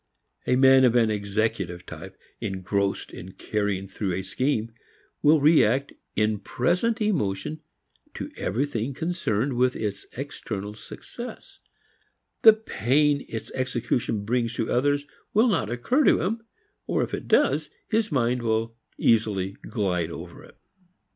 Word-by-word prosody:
A 125 - +4
man 130 0 +6
of 125 -2 +4
an 115 -2 +4
executive 100 -3 -2
type, - - -10 0.2
engrossed 95 +1 -2
in 95 +2 -9
carrying 100 -2 -2
through 95 0 -3
a 95 - -3
scheme, 115 +3 -1 0.5
will 150 +1 +5
react 140 -3 +4 0.2
in 105 0 +1
present 180 - 0
emotion 150 - -1 0.5
to - - -5
everything 125 +2 -2
concerned 145 - -1
with 125 +1 +2
its 100 -2 -4
external 105 -7 -5
success; 240 - -10 0.8
the 220 - +10
pain 145 - +1
its 115 - -6
execution 120 -4 -1
brings 120 +1 0
to 115 - -2
others 145 +3 +2 0.3
will 220 +4 +5
not 170 - +1
occur 125 - +1
to - - +5
him, 225 +5 -1 0.5
or - - +1
if - - -5
it - - -4
does, 155 - +3 0.2
his 220 -1 0
mind 125 -2 +1
will 115 0 -1 0.2
easily 105 -4 +2 0.2
glide 95 -7 0
over - - -9
it. - - -17
120 Hz, 135 wpm, -25 LUFS, 105-145 Hz, 0.8 s, the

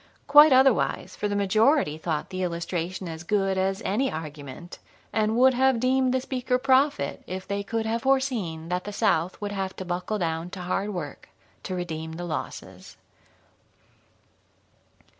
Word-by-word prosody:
Quite 295 +1 +8
otherwise, 260 -2 +3
for 210 - -2
the 205 - -2
majority 215 - +3
thought 155 -2 -3
the 185 0 -4
illustration 175 +1 -3
as 160 -1 -6
good 195 +1 0
as 190 +1 -1
any 255 +7 +1
argument, 155 +1 -8 0.3
and 215 0 +1
would 260 +1 +6
have 260 -1 +3
deemed 255 +1 +2
the 260 - +1
speaker 255 -1 -1
prophet 260 - +2
if 185 +1 -6
they 200 0 -2
could 225 +2 -3
have 225 +1 -1
foreseen 235 -12 0
that 180 0 -2
the 205 - -5
South 195 -5 +1
would 205 -1 -4
have 195 -1 -3
to 185 - -6
buckle 180 +4 -2
down 165 -2 -2
to 185 0 -8
hard 195 +3 -2
work 160 -7 -7 0.3
to 185 - -4
redeem 160 -2 -5
the 175 +2 -5
losses. 160 -3 -7
195 Hz, 160 wpm, -26 LUFS, 175-250 Hz, 0.3 s, Quite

